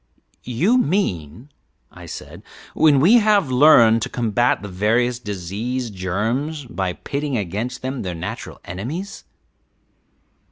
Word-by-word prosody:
"You 180 - +2
mean," 120 - -2 0.4
I - - -12
said, - - -9 0.3
"when 150 -3 +4
we 205 - +6
have 205 - +2
learned 120 -5 +6
to - - -3
combat 120 -1 0
the - - -5
various 115 +6 0
disease 110 +4 -4
germs 115 - -2
by 95 -6 -3
pitting 140 +5 -3
against 110 +7 -4
them 130 0 -3
their 90 -2 -4
natural 80 - -7
enemies." 135 - -6
120 Hz, 120 wpm, -21 LUFS, 100-145 Hz, 0.4 s, we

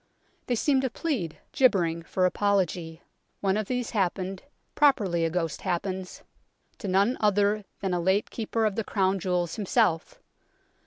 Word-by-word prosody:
They 245 - +1
seem 270 +3 +2
to 260 - 0
plead, 240 - -3
gibbering, 175 -10 +2
for 185 +2 0
apology. 180 -4 0 0.4
One 195 -1 +1
of 215 -1 -1
these 245 -2 -2
happened 190 -2 -1 0.3
properly 205 - +3
a - - +1
ghost 165 -2 -2
happens 185 +1 -3 0.6
to 205 - -5
none 200 +6 +2
other 205 0 +2 0.2
than 190 -2 -1
a 175 - +1
late 190 +4 +1
Keeper 225 0 -1
of 215 - +1
the 225 - -1
Crown 195 -2 +1
Jewels 180 0 -1
himself. 175 -5 +1
195 Hz, 150 wpm, -27 LUFS, 180-215 Hz, 0.6 s, properly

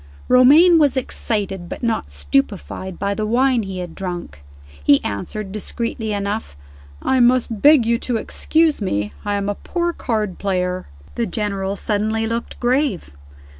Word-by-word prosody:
Romayne 300 +8 +7
was 285 -3 +3
excited, 200 -7 -2
but - - -7
not 225 - -1
stupefied, 135 - -2
by 200 +1 -1
the 215 +1 -2
wine 250 +1 +2
he 195 -2 -6
had 175 -2 -6
drunk. 175 - -6 0.4
He 140 - +5
answered, 190 - -4
discreetly 220 +1 -3
enough, 200 - -3 0.5
"I 260 - +2
must 240 -3 +3
beg 290 -5 +6
you 235 0 +1
to 245 -2 -1
excuse 315 +4 +1
me; 105 - -2
I 205 0 -1
am 200 0 -2
a 205 - 0
poor 345 - -2
card 215 - -2
player." 185 -2 -1 0.3
The 235 -1 -1
General 195 -1 -2
suddenly 215 +2 -1
looked 230 +1 -4
grave. 250 - 0
215 Hz, 150 wpm, -20 LUFS, 190-245 Hz, 0.5 s, Romayne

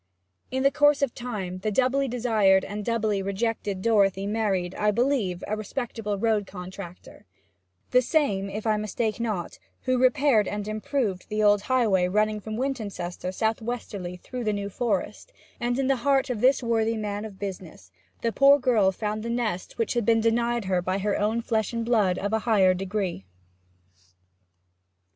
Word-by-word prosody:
In 260 +1 -1
the 275 - +5
course 290 -1 +4
of 270 - 0
time 200 -7 -5
the 215 - -1
doubly 265 +4 +2
desired 220 -6 +3
and 205 +1 -5
doubly 220 -3 0
rejected 200 -1 -2
Dorothy 200 -4 +3
married, 200 -4 -1
I 210 +2 +1
believe, 215 -5 0
a 215 - -2
respectable 215 -1 -4
road 210 -1 +1
contractor 180 -1 -10 0.6
the 250 - +5
same, 230 - +1
if 210 +3 -5
I 215 -1 +2
mistake 215 +1 -2
not, 215 -7 -3 0.2
who 255 -1 +1
repaired 255 -5 +4
and 205 0 -4
improved 215 -2 -2
the 215 0 0
old 205 -1 +5
highway 210 -7 +2
running 215 +3 +1
from 215 +1 -6
Wintoncester 205 -9 -3
south 220 +4 -1
westerly 205 -6 -5
through 250 +6 -6
the 215 -2 0
New 200 0 -4
Forest 245 - -2 0.3
and 240 +1 -1
in 270 - 0
the 270 0 +2
heart 270 +1 +1
of 220 -4 -3
this 260 +1 +4
worthy 225 -1 +1
man 205 -1 -3
of 210 -3 -8
business 180 - -7 0.3
the 230 - +1
poor 275 +4 +6
girl 235 -8 +3
found 210 +2 -3
the 230 - -5
nest 230 -6 -2
which 230 - 0
had 240 -1 0
been 225 +2 +3
denied 235 0 +1
her 185 -1 +1
by 185 +2 -1
her 205 +1 0
own 220 +3 0
flesh 220 -2 -1
and 230 -1 -2
blood 210 -6 +2
of 205 +2 -2
higher 200 -6 +4
degree. 185 - -3
215 Hz, 170 wpm, -26 LUFS, 195-240 Hz, 0.6 s, poor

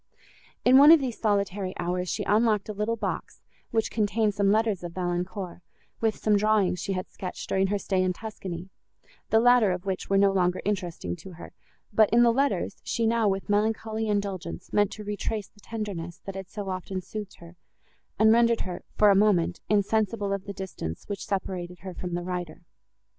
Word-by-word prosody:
In 255 +2 +8
one 290 +3 +9
of 330 - +9
these 255 -5 -4
solitary 200 -3 0
hours, 180 +1 -2
she - - -2
unlocked 215 -1 +2
a 215 - -4
little 210 +3 -1
box, 230 - -4 0.3
which 225 -1 0
contained 215 0 +1
some 200 0 +2
letters 215 -4 +1
of 175 -1 -6
Valancourt, 180 0 -3 0.4
with 225 -1 +1
some 210 -1 +2
drawings 205 -3 +2
she 195 - -2
had 185 0 -3
sketched, 180 -2 -7
during 190 0 +2
her 205 +1 0
stay 190 -1 0
in 185 0 +2
Tuscany, 185 -3 -7 0.6
the 220 - +5
latter 245 -4 +5
of 180 +1 -4
which 190 -1 -3
were 195 - +3
no 200 0 +5
longer 180 -1 +1
interesting 175 - -2
to 190 - -11
her; 170 - -11 0.4
but, 215 0 +5
in 235 +1 +5
the 235 -1 +5
letters, 275 +3 0
she 230 - -1
now, 225 -1 +2
with 195 0 -2
melancholy 220 +1 0
indulgence, 200 -5 -3
meant 205 -1 +3
to 215 - -8
retrace 205 0 -3
the 205 - -25
tenderness, 200 -7 -5
that 195 - -5
had 190 -1 -7
so 205 -1 -5
often 185 0 -4
soothed 205 +2 -7
her, 170 +1 -14 0.6
and 220 0 +6
rendered 235 0 +4
her, 180 -1 -5 0.2
for 210 -1 +6
a - - +4
moment, 195 -4 +3
insensible 205 0 +1
of 200 -1 -4
the 200 - -5
distance, 185 - -6
which 200 -1 -5
separated 180 -2 -4
her 190 -1 -7
from 175 0 -5
the 175 - -3
writer. 175 -2 -5
200 Hz, 190 wpm, -27 LUFS, 185-215 Hz, 0.6 s, one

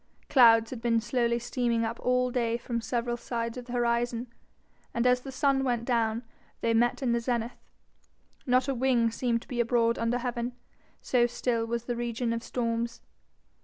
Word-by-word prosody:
Clouds 230 -3 +6
had 245 -3 -6
been 230 -1 +2
slowly 235 0 0
steaming 235 -1 0
up 230 +1 -4
all 250 0 +1
day 235 -2 0
from 235 0 -3
several 240 0 -1
sides 230 -1 -3
of 250 -1 -7
the 245 - -8
horizon, 240 0 0 0.6
and 235 +1 +1
as 250 0 +4
the 270 - -8
sun 270 0 +2
went 240 -3 0
down, 230 -1 0 0.4
they 230 - +2
met 240 +4 +2
in 245 - +1
the 235 - +2
zenith. 235 0 -2 0.9
Not 255 +1 +3
a 275 - +1
wing 240 -2 +2
seemed 235 0 -1
to - - -22
be 245 - -4
abroad 235 -1 +2
under 230 +1 +1
heaven, 245 0 -3 0.5
so 240 -2 +2
still 235 -1 -1
was 235 0 -2
the 240 - -2
region 235 0 -2
of 230 - -3
storms. 235 -1 -3
235 Hz, 180 wpm, -28 LUFS, 230-250 Hz, 0.9 s, Clouds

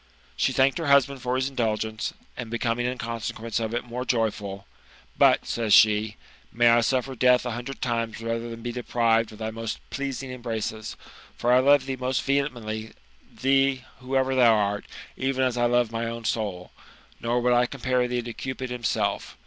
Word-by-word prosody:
She 135 - +1
thanked 135 +4 +2
her 165 - -2
husband 140 -1 +4
for 125 0 -1
his 130 +1 0
tndulgenee, 110 -3 -2 0.2
and 120 -2 -6
becoming 115 +1 -1
in 125 +1 -3
consequence 115 0 -3
of 110 -1 -2
it 120 - -1
more 125 +1 -5
joyful; 110 -5 -1
^ - - -33 0.4
But," - - +4
says 115 -3 +2
she, 105 -1 +4 0.2
'* - - -29
may 120 0 +4
I 120 0 +5
suffer 130 +2 0
death 125 0 +3
a 120 - -2
hundred 125 +4 -6
times 115 -3 -2
rather 115 +1 -3
than 115 0 -8
be 120 0 -3
depi^Ted 115 -2 +1
of 110 - -12
thy 110 0 -4
most 115 0 -5
pleasing 135 -2 -4
embraces; 110 -3 -4 0.4
for 120 +1 +2
I 125 - +6
love 140 0 +5
thee 135 -1 -3
most 130 0 -1
vehemently, 120 -6 -2 0.4
thee, 135 0 +2 0.2
whoever 130 +1 0
thou 120 -3 +5
art, 100 -1 0 0.3
even 130 0 0
as 130 -2 +1
I 120 0 +2
love 120 -1 +2
my 115 0 -2
own 115 0 -6
soul, 100 -6 -2 0.5
nor 120 +1 0
would 125 0 +2
I 120 0 +3
compare 130 -2 0
thee 120 0 -2
to 120 0 -6
Cupid 130 0 -5
himself. 120 -2 -2
120 Hz, 190 wpm, -25 LUFS, 115-130 Hz, 0.5 s, I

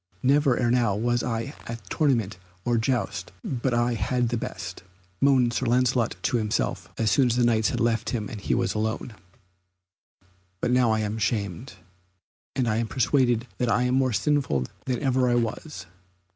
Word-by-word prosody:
"Never 140 -1 +3
ere 120 -2 +1
now 120 -5 +2
was 120 +3 +1
I 115 +3 -3
at 115 -4 -7
tournament 115 - +1 0.3
or 120 -1 +2
jousts 105 -6 -1
but 130 0 -2
I 120 0 +1
had 120 +1 0
the 120 - -1
best," 110 - -5 0.4
moaned 130 -4 +4
Sir 130 - -1
Lancelot 125 -1 +2
to 125 - +1
himself, 110 -2 -1
as 110 -3 +1
soon 130 +6 +4
as 120 - +1
the 125 - +2
Knights 110 -2 +3
had - - -2
left 115 -2 +1
him 110 -4 -2
and 105 - -7
he - - 0
was 120 -1 0
alone. 110 +2 -2 1.5
"But 120 - 0
now 125 -3 +3
am 105 -1 -1
I - - -5
shamed, 105 +2 -2 0.8
and 130 -2 +1
I 110 -1 +1
am 115 0 0
persuaded 120 0 +2
that 125 - +1
I 115 +2 +2
am 125 0 +1
more 130 -1 +2
sinful 120 - +1 0.2
than 130 +1 -2
ever 130 -2 +2
I 120 - +3
was." 115 - -3
120 Hz, 180 wpm, -26 LUFS, 110-125 Hz, 1.5 s, moaned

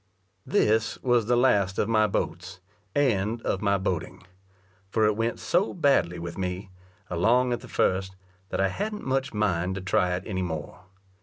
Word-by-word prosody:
This 110 +1 +2
was 120 -4 +2
the 120 - +3
last 100 -7 +3
of - - +1
my 110 -1 +3
boats, 90 -1 -3 0.4
and 115 -5 +1
of 95 - -1
my 100 -1 +2
boating; 95 -3 -3 0.7
for 110 +2 +2
it 105 -1 +2
went 115 +2 -1
so 185 +5 +1
badly 140 - +2
with 85 +2 -6
me, 95 +1 -4 0.4
along 120 +8 +2
at 120 - -2
the - - -12
first, 95 0 0 0.3
that - - -3
I 95 0 +3
hadn't 210 - -4
much 135 +1 0
mind 95 -4 0
to 95 - -4
try 90 -1 +1
it 90 - -5
any 95 -4 -3
more. 85 -1 -5
100 Hz, 170 wpm, -26 LUFS, 90-120 Hz, 0.7 s, the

